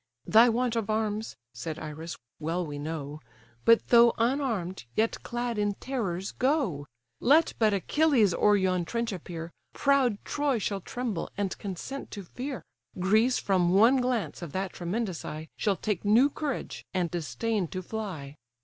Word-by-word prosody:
"Thy 230 +3 +7
want 240 +1 0
of 225 -2 -1
arms 215 0 -1 0.2
(said 155 +6 -5
Iris) 160 +2 -6 0.2
well 165 +3 -1
we 145 -2 -6
know; 150 -1 -5 0.5
But 230 0 +5
though 235 -1 +7
unarm'd, 230 - -1
yet 225 +1 +1
clad 240 -2 -3
in 205 -1 +1
terrors, 195 -9 -3
go! 255 - 0 0.3
Let 310 +5 +4
but 220 -2 +4
Achilles 225 - +3
o'er 210 +4 +4
yon 185 -2 +1
trench 235 +5 -2
appear, 170 -2 -6 0.2
Proud 270 -6 +3
Troy 290 -3 0
shall 200 -2 -2
tremble, 235 -4 -3
and 200 -3 -1
consent 205 +8 -6
to 200 - -5
fear; 250 - -6 0.3
Greece 215 +7 +3
from 185 -2 +2
one 230 +7 +6
glance 250 -6 -1
of 170 -5 -7
that 190 0 -2
tremendous 185 0 -3
eye 155 +1 -6
Shall 205 -2 +1
take 210 -5 -2
new 230 +8 +5
courage, 290 -4 -4
and 175 -3 0
disdain 175 - -1
to 185 +3 -5
fly." 175 -10 -6
205 Hz, 155 wpm, -28 LUFS, 175-240 Hz, 0.5 s, Thy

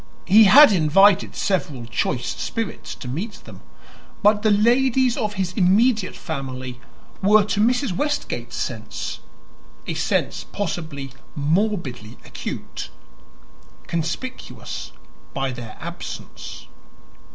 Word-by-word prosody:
He 215 +4 +7
had 285 +6 +9
invited 195 +3 +4
several 150 - -1
choice 120 +1 -1
spirits 225 -2 -4
to - - -9
meet 180 - -4
them; - - -12 0.6
but 210 +1 +5
the 220 - +3
ladies 245 +4 +3
of 210 -1 -2
his 185 -2 -2
immediate 210 +2 +3
family 130 -5 -5 0.4
were 210 +2 +5
to 205 0 -2
Mrs. 245 +1 +2
Westgate's 290 +7 -2
sense - - -4 0.7
a - - -2
sense - - -1
possibly 160 -8 -4 0.2
morbidly 145 - -1
acute - - -6 1.0
conspicuous 170 +11 -5 0.4
by 135 -1 -1
their 120 -3 -8
absence. - - -8
195 Hz, 105 wpm, -22 LUFS, 145-220 Hz, 1.0 s, had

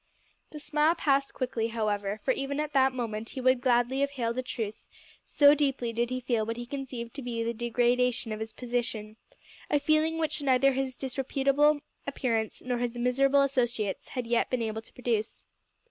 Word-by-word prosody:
The 305 - -9
smile 300 +2 +2
passed 275 -4 +1
quickly, 245 -3 -1
however, 210 -2 -2
for 265 - +3
even 275 +2 -2
at 300 0 -2
that 265 -1 +4
moment 225 -3 -4
he 265 - -7
would 255 -1 +3
gladly 245 +1 +2
have 280 0 +2
hailed 245 -3 -2
a - - +1
truce, 225 -4 -5 0.4
so 285 -1 +6
deeply 270 -5 0
did 235 +1 0
he 255 0 -2
feel 235 -3 0
what 230 +2 -3
he 240 - -5
conceived 245 -3 -6
to 280 - -6
be 235 -2 -3
the 230 +1 -1
degradation 240 0 +1
of 215 - -4
his 220 0 -5
position 230 -3 -3 0.5
a 295 - +3
feeling 310 +2 +2
which 315 -2 -1
neither 270 0 +4
his 265 -1 -2
disreputable 275 +3 +1 0.3
appearance 230 -5 -1
nor 250 -1 -1
his 245 0 -2
miserable 270 +3 +3
associates 240 -7 -1
had 250 -2 -4
yet 235 0 +1
been 250 -2 0
able 220 0 -3
to - - -20
produce. 230 -3 -2
250 Hz, 185 wpm, -29 LUFS, 230-275 Hz, 0.5 s, so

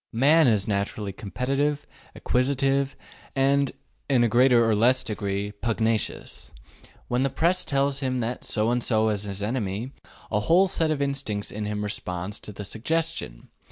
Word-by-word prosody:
Man 150 +7 +5
is 105 -4 +2
naturally 100 0 -2
competitive, 135 +8 -1 0.3
acquisitive, 135 +1 +1 0.4
and, 135 0 +2 0.4
in 130 -3 +4
a - - +4
greater 120 0 +4
or 110 - +3
less 125 +5 +3
degree, 100 -1 -3
pugnacious. 110 +1 -2 0.6
When 125 +1 0
the 135 - +2
Press 170 +7 +2
tells 140 -1 0
him 130 -2 -1
that 120 +2 -3
so 110 +1 0
and 120 0 0
so 110 -2 +2
is 105 -1 -2
his 100 0 -5
enemy, 110 +1 -2 0.4
a 105 - +2
whole 175 - +4
set 165 -3 0
of 145 -2 0
instincts 135 -8 -3
in 105 +1 -4
him 105 0 -3
responds 95 -1 -4
to - - -9
the 105 0 -7
suggestion. 120 - -2
120 Hz, 160 wpm, -25 LUFS, 105-140 Hz, 0.6 s, Man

